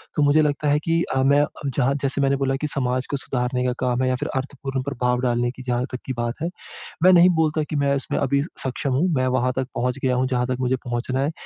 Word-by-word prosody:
तो 150 Hz, -, +2 dB
मुझे 145 Hz, +2 st, +5 dB
लगता 150 Hz, 0 st, 0 dB
है 145 Hz, +1 st, +3 dB
कि 165 Hz, +2 st, 0 dB
अ, 130 Hz, -, +2 dB
मैं 140 Hz, +2 st, +4 dB
अ, 145 Hz, -, +2 dB, 0.2 s
जहाँ 135 Hz, 0 st, +1 dB
जैसे 140 Hz, +1 st, 0 dB
मैंने 135 Hz, 0 st, +3 dB
बोला 135 Hz, -1 st, 0 dB
कि 150 Hz, -, 0 dB
समाज 130 Hz, -3 st, -1 dB
को 140 Hz, -, 0 dB
सुधारने 125 Hz, -1 st, -2 dB
का 125 Hz, -, +1 dB
काम 125 Hz, -1 st, 0 dB
है, 130 Hz, -, +2 dB
या 130 Hz, -, +1 dB
फिर 125 Hz, -, -4 dB
अर्थपूर्ण 135 Hz, 0 st, -3 dB
प्रभाव 125 Hz, -2 st, 0 dB
डालने 120 Hz, -1 st, +1 dB
की 130 Hz, +1 st, -11 dB
जहाँ 125 Hz, 0 st, 0 dB
तक 125 Hz, -, -4 dB
की 130 Hz, -, -3 dB
बात 120 Hz, +2 st, -3 dB
है। 170 Hz, -, 0 dB, 0.5 s
मैं 185 Hz, +1 st, +7 dB
नहीं 175 Hz, +1 st, +7 dB
बोलता 155 Hz, 0 st, 0 dB
कि -, -, -3 dB
मैं 140 Hz, -1 st, +2 dB
इसमें 140 Hz, -, -2 dB
अभी 140 Hz, 0 st, +1 dB, 0.2 s
सक्षम 130 Hz, +1 st, -2 dB
हूँ। 150 Hz, +8 st, +2 dB
मैं 130 Hz, -1 st, +1 dB
वहाँ 125 Hz, 0 st, +1 dB
तक 130 Hz, -1 st, -1 dB
पहुँच 125 Hz, +3 st, -1 dB
गया 130 Hz, -1 st, +2 dB
हूँ, 130 Hz, +1 st, +1 dB
जहाँ 125 Hz, -1 st, 0 dB
तक 130 Hz, -1 st, -1 dB
मुझे 130 Hz, 0 st, +1 dB
पहुँचना 120 Hz, +2 st, -2 dB
है। 145 Hz, +3 st, 0 dB
130 Hz, 260 wpm, -23 LUFS, 125-140 Hz, 0.5 s, मैं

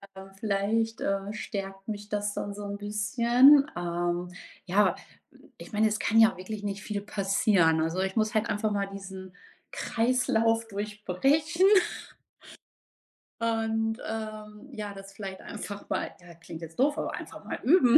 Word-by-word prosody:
Ähm, 190 Hz, 0 st, -10 dB
vielleicht, 220 Hz, +2 st, 0 dB
äh, 195 Hz, +1 st, -1 dB
stärkt 195 Hz, -2 st, -6 dB
mich 205 Hz, -1 st, -5 dB
das 205 Hz, 0 st, -1 dB
dann 205 Hz, -, -4 dB
so 205 Hz, +1 st, -7 dB
'n 200 Hz, 0 st, -4 dB
bisschen. 235 Hz, +7 st, +5 dB
Ähm, 175 Hz, 0 st, -2 dB, 0.3 s
ja, 195 Hz, +3 st, +3 dB, 0.6 s
ich -, -, -12 dB
meine, 215 Hz, +1 st, +4 dB
es 215 Hz, 0 st, -1 dB
kann 225 Hz, -, +3 dB
ja 225 Hz, -4 st, +6 dB
wirklich 205 Hz, +3 st, -6 dB
nicht 200 Hz, -1 st, -4 dB
viel 205 Hz, -1 st, -3 dB
passieren. 195 Hz, -5 st, +2 dB
Also, 165 Hz, +3 st, -1 dB
ich 190 Hz, 0 st, -1 dB
muss 220 Hz, +1 st, +1 dB
halt 215 Hz, +1 st, +1 dB
einfach 210 Hz, 0 st, 0 dB
mal 200 Hz, -1 st, 0 dB
diesen 190 Hz, -1 st, -9 dB, 0.4 s
Kreislauf 230 Hz, -1 st, +1 dB
durchbrechen. 215 Hz, -, +1 dB, 1.8 s
Und, 225 Hz, -1 st, 0 dB
ähm, 215 Hz, +2 st, -6 dB
ja, 210 Hz, -4 st, -6 dB
das 195 Hz, 0 st, -11 dB
vielleicht 195 Hz, -1 st, -7 dB
einfach 205 Hz, -1 st, -7 dB
mal -, -, -1 dB
ja, 175 Hz, -1 st, -13 dB
klingt 165 Hz, 0 st, -10 dB
jetzt 165 Hz, +4 st, -10 dB
doof, 290 Hz, +3 st, +3 dB
aber -, -, -2 dB
einfach -, -, -8 dB
mal -, -, -5 dB
üben. 275 Hz, -3 st, +7 dB
205 Hz, 150 wpm, -28 LUFS, 195-225 Hz, 1.8 s, üben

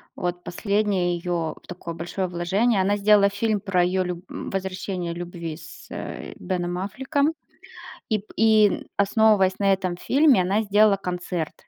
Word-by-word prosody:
вот, 175 Hz, 0 st, -3 dB
последнее 200 Hz, -2 st, 0 dB
её, 170 Hz, -2 st, -2 dB
такое 175 Hz, -2 st, -7 dB
большое 175 Hz, +3 st, -3 dB
вложение. 190 Hz, +5 st, +1 dB
Она 200 Hz, +2 st, +2 dB
сделала 200 Hz, 0 st, +5 dB
фильм 210 Hz, +1 st, 0 dB
про 185 Hz, -3 st, +1 dB
её 185 Hz, +1 st, +1 dB
люб 180 Hz, 0 st, -5 dB
м, -, -, -6 dB
возвращение 185 Hz, -2 st, -3 dB
любви 170 Hz, -2 st, -6 dB
с, 165 Hz, -, -13 dB
э, -, -, -6 dB
Беном 175 Hz, -1 st, -2 dB
Аффлеком. 275 Hz, -, -1 dB, 0.8 s
И 215 Hz, -2 st, +1 dB
п 200 Hz, -, -14 dB
и 215 Hz, -2 st, +4 dB
основываясь 200 Hz, -2 st, +3 dB
на 195 Hz, -1 st, +4 dB
этом 185 Hz, -2 st, -1 dB
фильме, 275 Hz, -, +4 dB
она 200 Hz, +5 st, +1 dB
сделала 205 Hz, 0 st, +4 dB
концерт. 180 Hz, -3 st, -4 dB
190 Hz, 150 wpm, -24 LUFS, 175-210 Hz, 0.8 s, сделала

